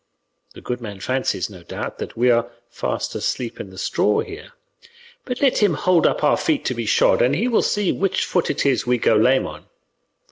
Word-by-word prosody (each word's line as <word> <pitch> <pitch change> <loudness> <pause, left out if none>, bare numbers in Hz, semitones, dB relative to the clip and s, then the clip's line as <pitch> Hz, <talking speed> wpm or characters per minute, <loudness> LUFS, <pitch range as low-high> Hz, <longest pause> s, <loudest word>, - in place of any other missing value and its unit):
The - - -11
good 125 0 -4
man 105 -4 -7
fancies, 130 -4 -1
no 95 -4 -13
doubt, - - -6
that - - -7
we 125 +1 +4
are 120 0 +1 0.2
fast - - -3
asleep 120 -3 -3
in 100 - -7
the 95 - -14
straw 105 +2 +1
here, 415 +4 -9 0.7
but 250 -1 -4
let 270 - +3
him 205 -7 +3
hold 175 +1 +3
up - - -1
our 145 - +4
feet 155 - 0
to - - 0
be 115 -2 -4
shod - - +3
and 125 +4 +3
he 220 +10 0
will 235 - +3
see 205 -3 +1
which 195 -1 0
foot 180 - 0
it - - -1
is 135 -3 +1
we 125 0 +3
go 115 -1 +3
lame 130 +5 +3
on. - - -9
130 Hz, 215 wpm, -21 LUFS, 115-185 Hz, 0.7 s, we